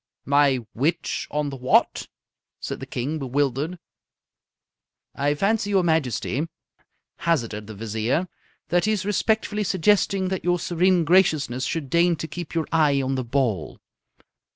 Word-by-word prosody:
"My 140 -1 +4 0.2
which 160 +7 -1
on 150 -1 -2
the - - -6
what?" 125 0 +2 0.5
said - - -5
the - - -7
King, 140 +6 -3
bewildered. 140 +5 -1 1.4
"I 145 +1 0
fancy, 205 +5 +1
your 195 -2 +3
Majesty," 160 -2 0 0.7
hazarded 115 -11 -1
the 110 - -8
Vizier, 110 - -1 0.4
"that 175 +2 +2
he 215 - +2
is 200 -2 -2
respectfully 210 0 0
suggesting 190 0 +2
that 190 -1 -3
your 175 0 +2
serene 175 0 +2
graciousness 150 -7 +2
should 155 -6 -3
deign 170 0 +4
to 160 - -5
keep 175 0 -7
your 165 -2 0
eye 150 -4 +3
on 135 0 -1
the 130 -1 -1
ball." 115 - -1
155 Hz, 140 wpm, -24 LUFS, 135-180 Hz, 1.4 s, My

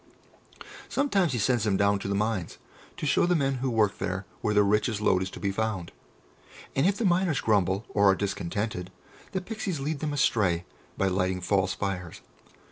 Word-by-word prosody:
Sometimes 200 - +1
he - - 0
sends 120 0 +2
them 100 -3 +2
down 100 0 +3
to - - -5
the 100 - 0
mines, 105 -4 -1 0.4
to - - -4
show 145 +4 +3
the 180 - +3
men 135 -3 +1
who 135 - 0
work 110 -4 +1
there 95 0 -3 0.2
where 105 -2 0
the 105 - +6
richest 105 +2 +1
lode 95 -3 +3
is 95 - -2
to - - -9
be 100 - -1
found; 100 -4 -2 0.8
and 135 +6 +3
if 200 0 +1
the 230 - -1
miners 175 -5 +2
grumble, 100 -1 +1
or 100 -1 +4
are 95 - +5
discontented, 100 0 -3 0.4
the 190 - -1
Pixies 195 -5 -4
lead 145 +2 -2
them 150 +1 -2
astray 100 -11 +1 0.3
by 95 - +2
lighting 95 0 0
false 95 +1 +1
fires. 90 -4 -4
105 Hz, 190 wpm, -27 LUFS, 95-135 Hz, 0.8 s, the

